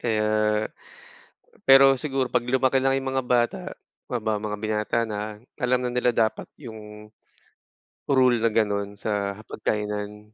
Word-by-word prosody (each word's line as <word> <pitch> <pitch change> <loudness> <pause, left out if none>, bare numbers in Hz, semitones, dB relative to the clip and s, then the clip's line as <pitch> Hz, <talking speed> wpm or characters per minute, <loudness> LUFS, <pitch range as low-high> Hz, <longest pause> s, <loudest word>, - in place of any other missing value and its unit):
Kaya, 110 -2 0 1.4
pero 135 0 +8
siguro 135 -4 -1
pag 120 - +1
lumaki 130 +1 +2
lang 135 0 +2
yung 135 0 -3
mga 130 -1 -1
bata, 125 +9 +1 0.5
ma 110 -4 -1
mga 105 0 -4
binata 110 +1 -1
na 105 -1 -5 0.2
alam 125 0 +2
na 125 - -1
nila 125 0 +2
dapat 110 -1 0
yung, 105 -3 -10 1.0
rule 130 -4 +3
na 115 - +3
ganon 100 -2 -1
sa 100 -2 -1
hapag-kainan. 105 0 -4
110 Hz, 135 wpm, -25 LUFS, 105-130 Hz, 1.4 s, pero